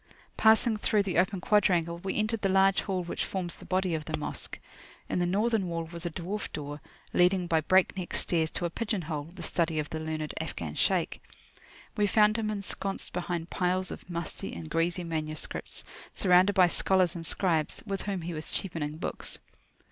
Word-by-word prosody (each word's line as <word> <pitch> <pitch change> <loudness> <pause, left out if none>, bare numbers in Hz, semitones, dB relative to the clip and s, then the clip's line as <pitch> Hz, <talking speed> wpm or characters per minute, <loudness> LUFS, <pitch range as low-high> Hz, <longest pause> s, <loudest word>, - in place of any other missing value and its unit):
Passing 220 0 +5
through 210 -1 +2
the 185 -3 +1
open 190 0 +1
quadrangle, 175 -5 +2
we 190 +2 -3
entered 215 +1 0
the 195 - +1
large 195 0 +4
hall 185 -3 -2
which 170 - -3
forms 180 -3 +1
the - - -13
body 185 -1 0
of 155 -1 -2
the 155 -1 -2
Mosque. 150 - -4 0.5
In - - -1
the 175 - +2
northern 210 +1 +1
wall 165 -1 -2
was 170 0 -4
a - - -1
dwarf 180 +6 -4
door, 145 0 -6 0.3
leading 180 0 +4
by 165 -2 +2
breakneck 185 +1 +2
stairs 160 -2 +2
to 175 - -3
a 170 - -2
pigeon 210 -2 -2
hole, 150 -1 -4
the 175 - -7
study 165 0 0
of 150 -1 -2
the 160 - -3
learned 155 -1 -3
Afghan 85 - -5
Shaykh. - - +1 0.7
We 205 -1 +2
found 215 +2 +4
him 215 -1 -1
ensconced 200 -1 -4
behind 175 -1 -3
piles 185 +1 0
of - - -9
musty 170 - -4
and 80 -2 -8
greasy 175 +2 +1
manuscripts, 155 -1 -3 0.3
surrounded 185 +1 +5
by 185 -1 +6
scholars 180 0 +3
and 170 - -6
scribes, 165 -1 +1
with 195 -1 -3
whom 195 -3 -3
he 175 +1 -4
was 155 0 -6
cheapening 155 -5 -3
books. 170 - -3
180 Hz, 185 wpm, -29 LUFS, 165-195 Hz, 0.7 s, by